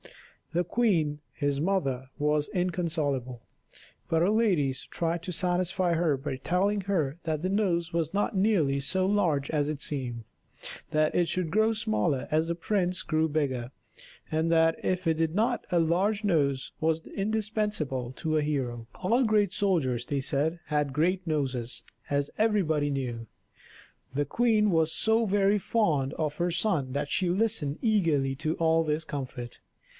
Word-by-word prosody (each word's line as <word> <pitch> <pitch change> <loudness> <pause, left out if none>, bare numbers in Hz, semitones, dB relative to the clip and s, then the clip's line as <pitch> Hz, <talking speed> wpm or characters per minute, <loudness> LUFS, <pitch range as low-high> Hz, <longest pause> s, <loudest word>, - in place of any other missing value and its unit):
The 175 +2 +2
queen, 170 -10 +1
his 145 0 -1
mother, 135 -8 -1
was 150 0 +1
inconsolable; 155 -9 -2 0.7
but 165 0 +3
her 190 - +3
ladies 175 - +1
tried 170 0 -2
to 180 - -4
satisfy 180 0 0
her 160 -4 +2
by 135 -1 -4
telling 195 +8 +1
her 170 -6 -1
that 155 -2 -2
the 185 - 0
nose 175 -5 0
was 165 -1 -1
not 205 +1 0
nearly 185 -9 +2
so 185 +7 0
large 170 -9 +1
as 150 -2 +1
it 150 -2 -3
seemed, 125 -6 -3 0.7
that 155 0 +2
it 175 0 +1
would 175 -4 -1
grow 220 +3 +3
smaller 130 - 0
as 160 +1 +2
the 170 - -1
prince 180 0 -1
grew 160 0 +1
bigger, 135 -5 -1 0.6
and 160 +1 +1
that 165 0 +4
if 185 0 -1
it 165 - +3
did 160 +1 -1
not 235 +4 +1
a 175 - +3
large 190 +6 +1
nose 140 -9 +1
was 160 0 0
indispensable 210 - -2
to 155 +4 -1
a - - +2
hero. 125 -6 -2
All 230 +8 +2
great 210 -4 +2
soldiers, 160 - 0
they 140 - -1
said, 150 +5 -1
had 150 -2 0
great 180 +5 +1
noses, 130 -6 -2 0.3
as 140 0 0
everybody 175 -10 +2
knew. 120 -5 -3 0.9
The 145 +1 +1
queen 215 - +2
was 160 -1 +2
so 225 +4 +2
very 200 +1 +3
fond 155 -12 +1
of 150 -2 -2
her 175 0 0
son 170 -7 0
that 145 +1 -2
she 185 - +1
listened 185 -7 0
eagerly 165 - +2
to 155 +2 -1
all 165 0 +3
this 155 0 -1
comfort. 130 -5 -6
160 Hz, 160 wpm, -28 LUFS, 145-190 Hz, 0.9 s, that